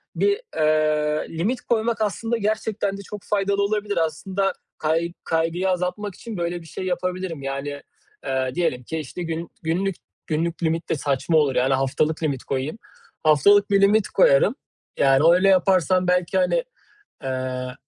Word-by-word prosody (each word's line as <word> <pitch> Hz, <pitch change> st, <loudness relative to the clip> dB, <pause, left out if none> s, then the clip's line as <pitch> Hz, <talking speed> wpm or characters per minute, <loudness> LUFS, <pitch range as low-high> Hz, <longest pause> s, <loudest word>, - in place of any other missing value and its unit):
bir, 405 Hz, +2 st, +1 dB
eee, 155 Hz, 0 st, +1 dB
limit 235 Hz, +9 st, -1 dB
koymak 225 Hz, -1 st, 0 dB
aslında 225 Hz, +3 st, -1 dB
gerçekten 215 Hz, -2 st, -1 dB
de -, -, -8 dB
çok 205 Hz, 0 st, -9 dB
faydalı 200 Hz, 0 st, 0 dB
olabilir. 205 Hz, 0 st, -1 dB
Aslında 185 Hz, +5 st, 0 dB, 0.2 s
kay 165 Hz, +2 st, 0 dB
kaygıyı 165 Hz, +3 st, 0 dB
azaltmak 180 Hz, +2 st, -2 dB
için 225 Hz, -5 st, -8 dB
böyle 175 Hz, 0 st, -2 dB
bir 165 Hz, -, -14 dB
şey 185 Hz, -, -6 dB
yapabilirim. 180 Hz, -3 st, -3 dB
Yani, 140 Hz, +1 st, -4 dB, 0.4 s
eee, 130 Hz, -1 st, -1 dB
diyelim 145 Hz, -8 st, 0 dB
ki, 160 Hz, +6 st, -4 dB
işte, 155 Hz, +5 st, -6 dB
gün 165 Hz, 0 st, -4 dB
günlük 180 Hz, +4 st, 0 dB, 0.3 s
günlük 165 Hz, +2 st, -2 dB
limit 165 Hz, +1 st, -1 dB
de -, -, +1 dB
saçma 145 Hz, +3 st, 0 dB
olur. 145 Hz, -3 st, +2 dB
Yani 130 Hz, +2 st, +2 dB
haftalık 145 Hz, +4 st, 0 dB
limit 140 Hz, -4 st, -1 dB
koyayım. 140 Hz, +9 st, -3 dB, 0.5 s
Haftalık 200 Hz, +7 st, +5 dB
bir 200 Hz, 0 st, +4 dB
limit 205 Hz, +1 st, +4 dB
koyarım. -, -, +4 dB, 0.4 s
Yani, 135 Hz, +1 st, +4 dB
o 165 Hz, +1 st, +7 dB
öyle 185 Hz, +2 st, +4 dB
yaparsam 185 Hz, -1 st, +3 dB
belki, 180 Hz, +3 st, +1 dB
hani, -, -, +2 dB, 0.6 s
eee, 130 Hz, -1 st, -3 dB
175 Hz, 155 wpm, -23 LUFS, 155-200 Hz, 0.6 s, o